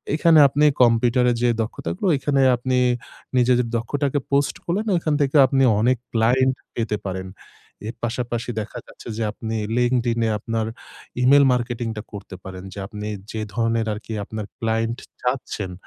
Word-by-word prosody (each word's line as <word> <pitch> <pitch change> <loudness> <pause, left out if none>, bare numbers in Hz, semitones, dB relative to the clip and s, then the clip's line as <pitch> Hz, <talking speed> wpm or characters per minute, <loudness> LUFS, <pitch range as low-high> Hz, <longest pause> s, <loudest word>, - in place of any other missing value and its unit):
এখানে 160 0 +5
আপনি 145 +2 +2 0.2
কম্পিউটারে 120 +1 +3
যে 120 - +3
দক্ষতা 110 -6 -4
গুলো 185 - 0
এইখানে 135 0 +1 0.2
আপনি 130 +1 0 0.6
নিজেদের 125 -1 +3
দক্ষতাকে 140 +4 -1
পোস্ট 140 0 +2
করলেন, 205 +6 -1
ওখান 160 -2 -1
থেকে 140 +1 0
আপনি 135 +1 +2 0.2
অনেক 125 +2 +3 0.2
ক্লায়েন্ট 125 +3 +3 0.2
পেতে 110 -2 -1
পারেন। 95 0 -4 0.6
এর 115 - -5
পাশাপাশি 120 0 -2
দেখা 105 - -8
যাচ্ছে - - -13
যে 115 - -1
আপনি 110 +1 -5 0.2
LinkedIn 120 -1 +1
এ - - +1
আপনার 115 0 -2 0.5
e-mail 140 +3 +6
মার্কেটিং 120 -1 -2
টা - - -3
করতে 100 -1 -8
পারেন 95 -1 -8
যে - - -8
আপনি 105 0 -6 0.2
যে 110 - -4
ধরনের 115 0 +1
আরকি 105 +2 -7
আপনার 110 0 -5
ক্লায়েন্ট 115 0 -1 0.2
চাচ্ছেন, 125 -6 -2
120 Hz, 155 wpm, -22 LUFS, 110-130 Hz, 0.6 s, e-mail